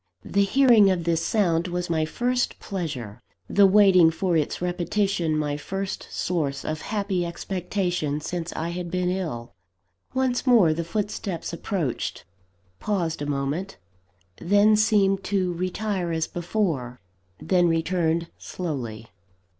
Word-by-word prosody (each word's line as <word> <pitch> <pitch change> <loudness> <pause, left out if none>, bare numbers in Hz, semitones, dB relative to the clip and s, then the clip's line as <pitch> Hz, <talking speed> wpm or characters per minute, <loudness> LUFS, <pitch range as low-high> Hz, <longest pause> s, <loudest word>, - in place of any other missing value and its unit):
The 200 - +1
hearing 235 -3 +5
of 180 -3 0
this 165 -1 0
sound 175 -5 +1
was 180 0 -3
my 160 -2 +1
first 245 +9 -1
pleasure, 135 - -5 0.3
the 200 -1 +5
waiting 190 -4 +6
for 170 +2 -1
its 155 -3 0
repetition 175 -1 0
my 145 -1 -1
first 195 +5 -5
source 145 -6 -2
of 155 0 -3
happy 200 -4 -1
expectation, 175 -3 -2
since 170 +2 -4
I 165 +2 -3
had 175 0 -4
been 180 0 0
ill. 155 -11 -4 0.6
Once 260 0 0
more 215 -11 +6
the 170 +2 -2
footsteps 195 -1 -3
approached 170 - -3 0.5
paused 175 -7 -1
a 145 - -2
moment 145 +7 -2 0.6
then 205 +4 +4
seemed 200 -3 +3
to 185 -2 0
retire 185 0 -2
as 160 -1 0
before 165 - -2 0.4
then 180 -2 +2
returned 165 0 0
slowly. 120 -10 -5
175 Hz, 130 wpm, -25 LUFS, 160-195 Hz, 0.6 s, waiting